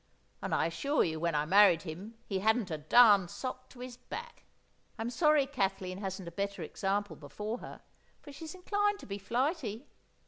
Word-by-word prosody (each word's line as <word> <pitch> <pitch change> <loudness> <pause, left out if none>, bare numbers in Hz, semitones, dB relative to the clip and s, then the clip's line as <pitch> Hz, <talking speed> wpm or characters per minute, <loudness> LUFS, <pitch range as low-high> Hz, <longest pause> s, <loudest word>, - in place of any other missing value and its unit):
And - - -1
I - - +2
assure 275 - +1
you, 160 -2 -2
when 170 -1 0
I 150 0 +1
married 190 -1 +6
him, 185 +7 -8
he 195 -2 -2
hadn't 220 -1 +1
a 155 - -2
darned 200 +2 +6
sock 255 +3 -6
to 245 - -13
his 250 -1 -7
back. 475 0 -9 0.5
I'm 230 +1 -3
sorry 300 0 +4
Kathleen 195 -7 -2
hasn't 190 -2 -5
a - - -6
better 200 0 -3
example 200 +5 -2
before 210 - -5
her, - - -10 0.4
for 290 - -12
she's 320 +5 -8
inclined 410 +2 0
to - - -12
be 200 0 -5
flighty. 245 - -1
210 Hz, 180 wpm, -32 LUFS, 185-260 Hz, 0.5 s, married